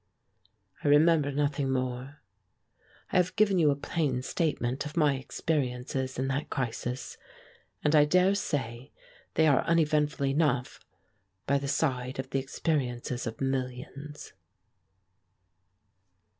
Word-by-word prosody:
I - - 0
remember 150 0 +5
nothing 145 -1 0
more. 130 +2 -3 0.9
I - - +2
have 180 0 +2
given 200 -3 +3
you 155 -3 +5
a 140 - +2
plain 140 -3 -1
statement 135 -5 -1
of 150 +2 -8
my 150 -3 +4
experiences 130 -1 -2
in 130 +1 -1
that 140 +3 -2
crisis, 125 0 -4 0.6
and 150 +1 +3
I 150 -1 +7
dare 180 +5 +4
say 135 - -3 0.4
they 160 - +4
are 145 -4 +4
uneventful 150 -3 +2
enough 135 -2 +1 0.7
by 140 +1 +2
the 140 - -4
side 130 -3 -1
of 130 0 -5
the 135 - +1
experiences 130 -4 -2
of 115 +3 -6
millions. 135 +2 -4
140 Hz, 120 wpm, -29 LUFS, 130-150 Hz, 0.9 s, I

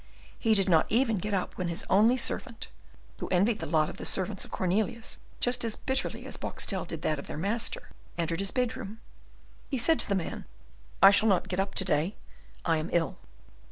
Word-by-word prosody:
He 225 -2 +3
did 195 -1 +2
not 165 -4 +4
even 225 -2 +2
get 210 +4 -3
up 185 - -3
when 180 - -1
his 170 -1 -2
only 220 +6 +4
servant 235 -1 -2 0.5
who - - -4
envied 200 +5 +2
the 160 - -4
lot 155 0 +2
of - - -8
the - - -7
servants 190 +1 0
of - - -9
Cornelius 215 +5 -1 0.2
just 245 0 +3
as 225 -2 0
bitterly 265 0 -2
as - - -6
Boxtel - - -2
did - - -7
that 155 -2 0
of - - -9
their - - -5
master 225 - -1 0.3
entered 165 0 -1
his 195 0 +1
bedroom. 225 -4 -3 0.7
He 270 - -1
said 320 +7 +3
to - - +1
the 200 - +2
man, 180 -4 -4 0.6
"I 195 - +11
shall 210 +2 +4
not 190 -3 +1
get 185 - -2
up 195 0 -1
to 190 - +2
day, 160 +7 +1 0.5
I 165 -2 +2
am 155 +2 -3
ill." 165 -4 0
195 Hz, 205 wpm, -29 LUFS, 175-225 Hz, 0.7 s, I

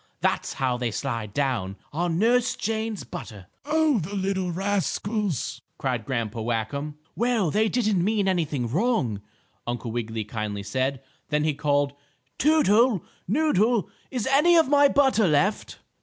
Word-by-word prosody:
That's - - 0
how 130 -2 0
they 120 -1 -1
slide 115 -3 -3
down 115 -7 -1 0.2
on 170 +1 0
Nurse 240 +5 +3
Jane's 220 -1 -2
butter." 100 -4 -8 0.2
"Oh, 305 -4 +2
the 190 +4 -5
little 190 -1 -1
rascals!" 195 - -1 0.2
cried 125 -5 -2
Grandpa 115 -3 -2
Whackum. 120 +6 -2 0.2
"Well, 230 -8 +1
they 220 +4 +2
didn't 215 -7 +1
mean 205 0 +1
anything 155 -9 0
wrong," 140 - 0 0.5
Uncle 120 -1 -3
Wiggily 115 -1 -3
kindly 105 -1 -4
said. 130 +6 -2 0.3
Then 150 -1 +1
he 155 -1 +1
called; 145 -1 +1 0.5
"Toodle! 255 - +4 0.2
Noodle! 230 - +2 0.2
Is 250 -5 -2
any 295 +6 +5
of 325 - +5
my 285 0 +6
butter 265 -7 +3
left?" 155 +7 +1
170 Hz, 140 wpm, -25 LUFS, -, 0.5 s, my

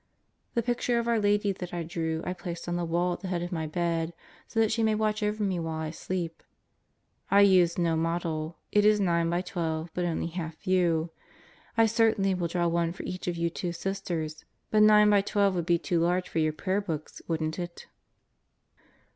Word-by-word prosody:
The 235 - +2
picture 240 0 0
of 235 0 -1
our 230 -1 +2
Lady 205 0 +2
that 180 -2 -6
I 170 - -2
drew 160 -1 -3
I 180 - -1
placed 175 -2 -7
on 175 - -1
the 175 0 -1
wail 175 +2 +1
at - - -6
the 195 - -6
head 175 -2 -1
of 175 - -5
my 160 -3 -2
bed 165 0 -1 0.3
so 225 - -2
that 220 -1 +3
she 225 +1 0
may 220 -1 +3
watch 215 0 0
over 210 0 0
me 190 -3 0
while 160 -1 -3
I 155 -1 -3
sleep. 170 0 -4 0.9
I 200 +1 +6
used 180 -4 +5
no 170 -2 +2
model. 165 -1 -2
It 210 - +4
is 210 0 +5
9 170 -3 +2
by 175 +1 +1
12, 165 -3 -3
but 180 - -1
only 170 -2 -1
half 165 -2 -5
view. 175 -3 +2 0.7
I 225 - +6
certainly 220 -3 +2
will 180 -2 -1
draw 175 +1 0
one 170 0 0
for - - -8
each 185 0 -5
of 175 -1 -1
you 170 0 0
two 175 0 -3
Sisters, 170 -4 -4 0.3
but 215 - +4
9 210 0 +7
by 205 -1 +5
12 200 -1 +2
would 175 -3 -1
be 175 -1 +4
too 170 0 -1
large 180 +2 +1
for 165 - -2
your 155 -1 +2
prayer 190 +5 -1
books, 160 -6 -5
wouldn't 160 0 -2
it? 175 -1 -6
175 Hz, 210 wpm, -28 LUFS, 165-200 Hz, 0.9 s, 9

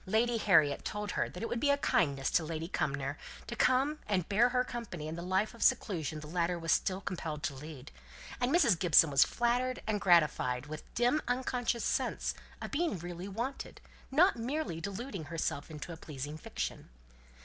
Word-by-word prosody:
Lady 230 +4 +2
Harriet 155 -9 +4
told 210 -1 -3
her - - -1
that 180 - -8
it - - 0
would 240 - -2
be 285 - +2
a 280 - +4
kindness 140 - +1
to 170 - +3
Lady 160 +1 -4
Cumnor 140 -4 -2 0.3
to 235 - -5
come 270 +6 +2
and 185 -5 0
bear 225 +5 +4
her 250 0 +2
company 230 -11 -6
in 160 - -4
the 170 - -5
life 190 +5 0
of 230 - -13
seclusion 160 - +1
the - - -9
latter 175 +2 0
was 165 -2 -2
still 190 +5 +1
compelled 160 -6 -4
to - - -1
lead; 145 0 -9 0.5
and 250 0 +1
Mrs. 265 - +4
Gibson 165 -3 +6
was 140 0 +7
flattered 250 +2 0
and 210 -2 -1
gratified 150 -7 +3
with 155 +1 -7
a - - -26
dim 245 +6 +3
unconscious 245 -1 -1
sense - - 0 0.3
of - - -5
being 320 - 0
really 175 +2 -6
wanted, 235 +7 -5 0.3
not 330 +6 +4
merely 245 - -3
deluding 200 - -5
herself 150 -1 -3
into 160 +2 -7
a - - -9
pleasing 145 -1 -6
fiction. - - -5
185 Hz, 190 wpm, -32 LUFS, 155-240 Hz, 0.5 s, was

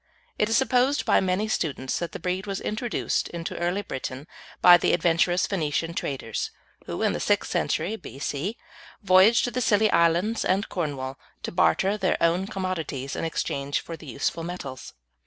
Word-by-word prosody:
It 210 - +2
is 225 - +3
supposed 265 +1 +2
by - - +4
many 190 +3 0
students 140 -10 -1
that 170 - -4
the - - -7
breed 185 +3 -2
was 195 -1 -2
introduced 230 +2 -1
into 170 -1 -5
early 175 +4 0
Britain 130 -4 -5 0.3
by 180 -1 +9
the - - +1
adventurous 175 +1 +2
Phoenician 165 -2 -1
traders 130 -8 -3 0.4
who, - - -3
in - - +2
the - - -3
sixth - - +1
century 215 - 0
B.C., 150 - -4 0.5
voyaged 195 +4 +6
to 245 - -1
the 250 - -2
Scilly 215 -1 +3
Islands 170 +7 +2
and 195 +2 +1
Cornwall 140 -6 -3 0.2
to - - -3
barter 190 +3 +2
their 190 -3 +1
own 175 +3 +2
commodities 175 -9 -3
in - - -2
exchange 140 -3 -2
for 165 - -7
the 160 -1 -13
useful 140 +6 -2
metals. 155 -7 -7
175 Hz, 170 wpm, -26 LUFS, 155-200 Hz, 0.5 s, by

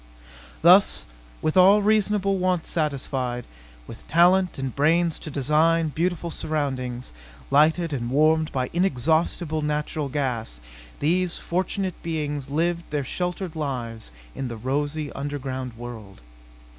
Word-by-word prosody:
Thus, - - +6 0.4
with 155 - 0
all 195 +3 +6
reasonable 205 -2 +2
wants 180 -2 0
satisfied, 135 -5 -2 0.4
with - - -11
talent 180 +2 +4
and 135 -2 -4
brains 165 +3 +2
to - - -7
design 155 +4 +2
beautiful 170 +3 -2
surroundings, 130 - -3 0.4
lighted 155 +3 +3
and 120 -3 -2
warmed 155 +3 +3
by 130 -2 -2
inexhaustible 160 -1 +1
natural 150 -1 -2
gas, 125 - -2 0.4
these 175 +3 +1
fortunate 185 +1 -2
beings 150 -4 -3
lived 170 +3 0
their 150 -2 -1
sheltered 180 +3 -3
lives 120 - -4 0.2
in 135 - -4
their 115 -2 -6
rosy 145 +5 -2
underground 130 -4 -5
world. 110 - -9
150 Hz, 120 wpm, -24 LUFS, 130-170 Hz, 0.4 s, Thus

